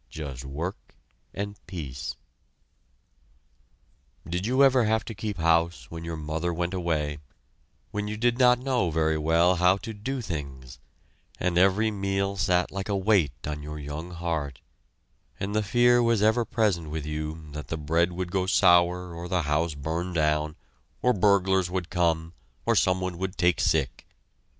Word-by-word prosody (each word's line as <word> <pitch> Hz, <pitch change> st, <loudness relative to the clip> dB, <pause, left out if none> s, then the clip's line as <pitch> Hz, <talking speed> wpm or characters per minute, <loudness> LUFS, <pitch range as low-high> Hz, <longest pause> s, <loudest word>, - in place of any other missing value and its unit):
Just 70 Hz, -3 st, -7 dB
work 80 Hz, +8 st, -6 dB, 0.4 s
and 100 Hz, +1 st, -6 dB
peace! 75 Hz, -8 st, -5 dB, 2.1 s
Did 90 Hz, +4 st, -2 dB
you 130 Hz, +3 st, +4 dB
ever 130 Hz, -3 st, +5 dB
have 110 Hz, 0 st, +1 dB
to 115 Hz, -, -6 dB
keep 105 Hz, -1 st, -4 dB
house 85 Hz, 0 st, +1 dB
when 80 Hz, 0 st, -7 dB
your 85 Hz, -1 st, -4 dB
mother 80 Hz, +3 st, -2 dB
went 85 Hz, +2 st, -2 dB
away, 75 Hz, -5 st, -1 dB, 0.7 s
when 105 Hz, 0 st, -3 dB
you 105 Hz, 0 st, -4 dB
did 120 Hz, +2 st, +1 dB
not 125 Hz, -1 st, +6 dB
know 125 Hz, -7 st, 0 dB
very 80 Hz, -1 st, +1 dB
well 85 Hz, +4 st, +3 dB
how 90 Hz, +2 st, +4 dB
to 110 Hz, +3 st, -7 dB
do 130 Hz, +6 st, -4 dB
things, 70 Hz, -, -6 dB, 0.6 s
and 90 Hz, -1 st, 0 dB
every 100 Hz, +5 st, +4 dB
meal 100 Hz, -1 st, -1 dB
sat 90 Hz, -2 st, +1 dB
like 95 Hz, +1 st, -5 dB
a 100 Hz, -, +1 dB
weight 95 Hz, -, +1 dB
on 75 Hz, 0 st, -4 dB
your 75 Hz, +1 st, -7 dB
young 75 Hz, +3 st, -6 dB
heart, 80 Hz, -6 st, -3 dB, 0.8 s
and 100 Hz, +1 st, -3 dB
the 110 Hz, -, +2 dB
fear 120 Hz, +3 st, +4 dB
was 115 Hz, -3 st, +2 dB
ever 110 Hz, +2 st, +3 dB
present 105 Hz, -9 st, 0 dB
with 75 Hz, -1 st, -4 dB
you 75 Hz, 0 st, -5 dB
that 75 Hz, +1 st, -7 dB
the 80 Hz, -, -3 dB
bread 80 Hz, +3 st, +1 dB
would 90 Hz, 0 st, -4 dB
go 95 Hz, -1 st, 0 dB
sour 90 Hz, -1 st, +4 dB
or 85 Hz, +1 st, -6 dB
the 90 Hz, -1 st, 0 dB
house 75 Hz, +2 st, 0 dB
burn 80 Hz, +5 st, -3 dB
down, 75 Hz, -1 st, +1 dB, 0.5 s
or 125 Hz, -, +4 dB
burglars 95 Hz, -2 st, +3 dB
would 90 Hz, -1 st, -3 dB
come, 85 Hz, -2 st, 0 dB, 0.3 s
or -, -, +3 dB
someone 95 Hz, -1 st, +1 dB
would 95 Hz, 0 st, -3 dB
take 90 Hz, -3 st, +2 dB
sick? -, -, 0 dB
90 Hz, 160 wpm, -26 LUFS, 80-100 Hz, 2.1 s, not